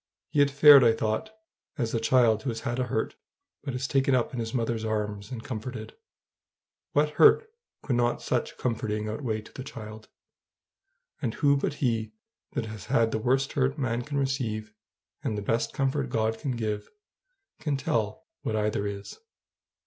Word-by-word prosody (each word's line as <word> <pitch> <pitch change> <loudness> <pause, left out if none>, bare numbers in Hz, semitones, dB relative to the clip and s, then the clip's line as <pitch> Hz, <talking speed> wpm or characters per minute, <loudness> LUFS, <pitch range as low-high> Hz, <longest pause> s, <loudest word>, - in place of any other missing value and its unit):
He 145 - +1
had 145 0 +6
fared, 145 -1 +9
I 115 -1 +6
thought, 110 - -1 0.5
as 115 -5 -1
the 115 - 0
child 115 -2 +4
who 135 - -2
has 115 -1 -4
had 120 -1 -2
a 125 - +1
hurt, 115 -2 -2 0.5
but 135 -3 -4
is 130 +1 -2
taken 135 0 +3
up 125 0 0
in 125 - -3
his 115 -1 -3
mother's 115 -2 -1
arms 105 -1 -2
and 120 -3 -6
comforted. 110 -2 -6 1.0
What 150 +1 +3
hurt 455 - +6 0.4
would 130 - +2
not 120 0 +2
such - - -2
comforting 110 -3 -2
outweigh 110 -1 -2
to 105 - -15
the 130 - -6
child? 110 -4 -9 1.1
And 115 - -2
who 140 -1 +4
but 140 +1 -1
he 115 -5 -1 0.4
that - - -1
has 110 -3 -8
had 115 -1 +2
the - - 0
worst 130 +4 +1
hurt 135 +1 +1
man 120 -4 -1
can 145 +2 -4
receive, 115 -6 -2 0.5
and 105 - -1
the 105 - -3
best 115 +3 0
comfort 135 0 0
God 110 0 0
can 135 -5 -2
give, 105 -2 -3 0.7
can 150 -2 -1
tell 110 -5 -1 0.2
what 110 - -2
either 105 -1 0
is? 100 0 -7
115 Hz, 175 wpm, -28 LUFS, 110-135 Hz, 1.1 s, fared